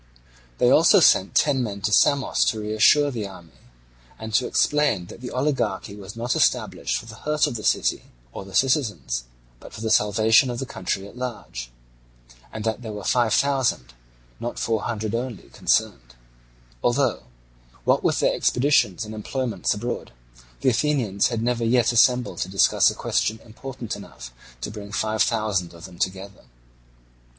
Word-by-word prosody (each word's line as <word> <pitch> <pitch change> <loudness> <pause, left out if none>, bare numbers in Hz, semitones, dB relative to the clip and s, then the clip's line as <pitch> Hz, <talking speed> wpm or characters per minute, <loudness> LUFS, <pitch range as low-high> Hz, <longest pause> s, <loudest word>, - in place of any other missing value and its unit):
They - - +3
also - - +6
sent 95 - +4
ten 140 -3 +3
men 100 -4 -4
to 105 - -1
Samos 140 +5 +3
to 110 - 0
reassure 110 +7 +3
the 110 -5 -4
army, 90 -4 -14 0.6
and 110 0 -8
to 125 +3 +2
explain 145 -11 +1
that 115 - -12
the 125 - -6
oligarchy 120 -8 -2
was 100 +1 -10
not 120 +2 -2
established - - 0
for - - -8
the 110 -1 -11
hurt 150 +3 +1
of 145 - -3
the 110 -2 -6
city - - +1 0.3
or - - -7
the 95 -1 -10
citizens, 110 - 0 0.3
but - - -13
for - - -9
the 110 -1 -1
salvation 110 +4 +4
of 120 - -4
the 135 - -3
country 95 -3 -4
at 100 - -15
large; 120 - -6 0.8
and 110 - -6
that 110 +2 -2
there 110 -2 -6
were 105 -1 -7
five 120 +2 +2
thousand, 130 - +1 0.5
not 120 - -5
four 115 -2 -1
hundred 110 -2 -3
only, 120 -2 -4
concerned; - - -1 0.7
although, 120 - +1 0.6
what - - +2
with - - +1
their - - +2
expeditions 120 -7 +2
and 110 - -8
employments 110 -2 -2
abroad, 115 - -5 0.5
the - - +3
Athenians 120 -7 +1
had 115 -2 -3
never 120 -1 0
yet 120 +1 +3
assembled 125 +1 +3
to - - -2
discuss 95 +1 +4
a - - -5
question - - -1
important 120 0 -7
enough - - -11 0.3
to - - -4
bring 105 -1 -9
five 110 +2 -1
thousand 100 -7 0
of 85 - -11
them 90 -2 -13
together. 95 +1 -4
110 Hz, 165 wpm, -23 LUFS, 100-125 Hz, 0.8 s, also